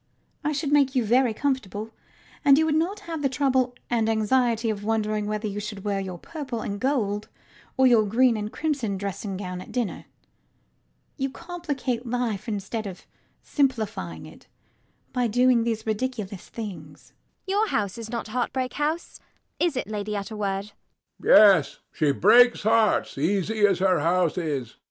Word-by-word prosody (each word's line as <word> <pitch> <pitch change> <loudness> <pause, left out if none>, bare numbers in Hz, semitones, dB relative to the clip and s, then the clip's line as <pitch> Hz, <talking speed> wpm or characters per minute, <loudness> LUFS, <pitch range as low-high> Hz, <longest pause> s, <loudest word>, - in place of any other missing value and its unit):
I 300 - 0
should 290 0 -2
make 280 -2 +3
you 250 -3 +2
very 245 +2 +3
comfortable; 220 -4 -2 0.5
and 280 -2 +7
you 315 - +3
would 315 - +1
not 355 +7 0
have 330 -6 -5
the 275 - +1
trouble 260 -2 +1
and 225 -2 +1
anxiety 225 +1 +2
of 205 -1 -5
wondering 215 -1 0
whether 215 +1 -2
you 205 0 -4
should 205 -1 -6
wear 200 -2 -1
your 185 -2 -5
purple 270 - -6
and 200 -1 -4
gold 215 -6 -1 0.5
or 265 - +5
your 235 -4 +6
green 240 +3 +3
and 210 0 -4
crimson 270 -11 -2
dressing 195 0 -4
gown 180 -2 -5
at - - -11
dinner. 240 -5 -3 1.1
You 270 -1 -1
complicate 290 -7 -4
life 235 -4 -2
instead 210 +1 -3
of 185 -2 -9 0.4
simplifying 215 - -1
it - - -15 0.7
by 250 -1 +1
doing 245 +1 +3
these 225 -2 -2
ridiculous 215 -4 -3
things. 175 -10 -9
ELLIE. - - -45 0.2
Your 440 - +2
house 205 - -1
is 225 -1 -7
not 235 -2 -4
Heartbreak 255 +2 -2
House: 305 +3 -2 0.4
is 340 -6 +1
it, - - -1
Lady 210 0 -4
Utterword? 200 -1 -3 0.5
HECTOR. - - +4 0.3
Yet 140 - -9
she 150 -3 +1
breaks 240 - +5
hearts, 220 -8 +2
easy 205 +6 +2
as 195 -3 +1
her 185 -2 +2
house 170 +2 +2
is. 140 -8 -3
225 Hz, 160 wpm, -25 LUFS, 200-260 Hz, 1.1 s, and